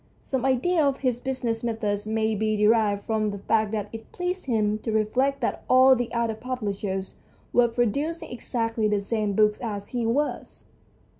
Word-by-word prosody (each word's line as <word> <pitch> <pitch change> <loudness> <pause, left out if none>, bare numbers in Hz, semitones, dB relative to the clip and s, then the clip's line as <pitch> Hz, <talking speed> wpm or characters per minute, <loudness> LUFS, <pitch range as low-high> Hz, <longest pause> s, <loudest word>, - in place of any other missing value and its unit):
Some 265 -1 -2
idea 305 +6 +2
of 280 -2 0
his 250 -3 0
business 245 -3 -2
methods 215 -3 -2
may 220 0 0
be 215 0 0
derived 210 -1 +3
from 215 -1 0
the 200 - -4
fact 215 +2 +1
that 210 -2 -2
it 225 0 -9
pleased 360 +1 -3
him 215 -4 +1
to 225 - -3
reflect 255 +6 +1
that 235 - -2
all 260 +1 +7
the 245 -1 -3
other 235 -1 0
publishers 205 -5 -4 0.4
were 245 -1 +5
producing 280 - -1
exactly 230 -2 -1
the 210 -1 +1
same 210 0 -1
books 210 +1 +2
as 205 -4 -4
he 245 -2 -2
was. 290 +6 -2
225 Hz, 170 wpm, -25 LUFS, 215-255 Hz, 0.4 s, all